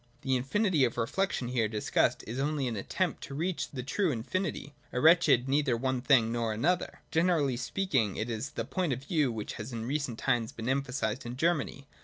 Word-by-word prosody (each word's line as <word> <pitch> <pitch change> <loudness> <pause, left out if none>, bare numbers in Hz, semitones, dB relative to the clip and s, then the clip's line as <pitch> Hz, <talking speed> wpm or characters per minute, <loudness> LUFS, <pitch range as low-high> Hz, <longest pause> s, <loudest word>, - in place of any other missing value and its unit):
The 130 -1 +1
infinity 155 - +2
of 120 -2 +1
reflection 125 - -1
here 120 -3 +1
discussed 105 0 +1
is 120 +4 -5
only 145 -1 0
an 120 - -2
attempt 165 - -2
"to 140 - -8
reach 170 +4 -2
the 125 -3 -5
true 185 +8 0
infinity, 145 +4 -3 0.2
a - - -1
wretched 155 -5 +5
neither 135 -3 +2
one 130 +1 -1
thing 120 -4 +4
nor 115 -2 -1
another. 170 +12 0
Generally 160 -6 +2
speaking, 125 - 0
it 110 - -2
is 115 +4 -3
the 115 -6 -4
point 170 +1 -1
of 130 +2 -5
view 145 -4 +1
which 110 -2 -5
has 110 +5 -7
in 115 -1 -4
recent 140 -3 -2
times 120 -4 0
been 115 +1 -6
emphasised 130 -3 -1
in 120 +1 -6
Germany. 150 -3 0
130 Hz, 195 wpm, -30 LUFS, 120-155 Hz, 0.2 s, wretched